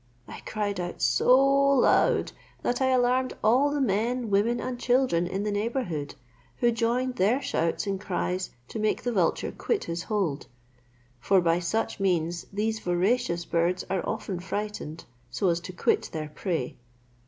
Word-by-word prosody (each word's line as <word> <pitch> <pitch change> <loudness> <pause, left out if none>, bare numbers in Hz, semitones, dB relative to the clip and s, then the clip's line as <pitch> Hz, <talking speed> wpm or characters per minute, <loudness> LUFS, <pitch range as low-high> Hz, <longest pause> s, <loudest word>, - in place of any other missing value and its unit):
I - - -9
cried 205 -2 -2
out 175 0 -4
so 125 - +4
loud, 275 -1 +3 0.3
that 245 +2 0
I 260 - +3
alarmed 255 0 +2
all 255 +7 +4
the 290 0 -1
men, 235 0 0
women, 225 +5 +2
and 250 0 -4
children 245 -10 +2
in 190 +2 -3
the 210 - -1
neighbourhood, 205 - -2 0.4
who 240 - +3
joined 245 +2 0
their 215 +8 +3
shouts 165 -8 -1
and 195 -1 -2
cries 185 -1 -2 0.2
to - - -5
make 215 0 0
the 245 - 0
vulture 185 -7 0
quit 460 - -1
his 170 0 -4
hold; 180 -8 -2 0.7
for 190 +10 +3
by 170 -1 +2
such 190 +7 -2
means 175 -3 0
these 220 +2 -1
voracious 180 0 0
birds 170 +2 0
are 190 -2 +1
often 205 -4 -3
frightened 190 -4 -5 0.2
so 180 - 0
as 170 0 +1
to 180 +1 -8
quit 180 - 0
their 155 -2 -4
prey. 160 -5 -3
205 Hz, 160 wpm, -27 LUFS, 175-245 Hz, 0.7 s, so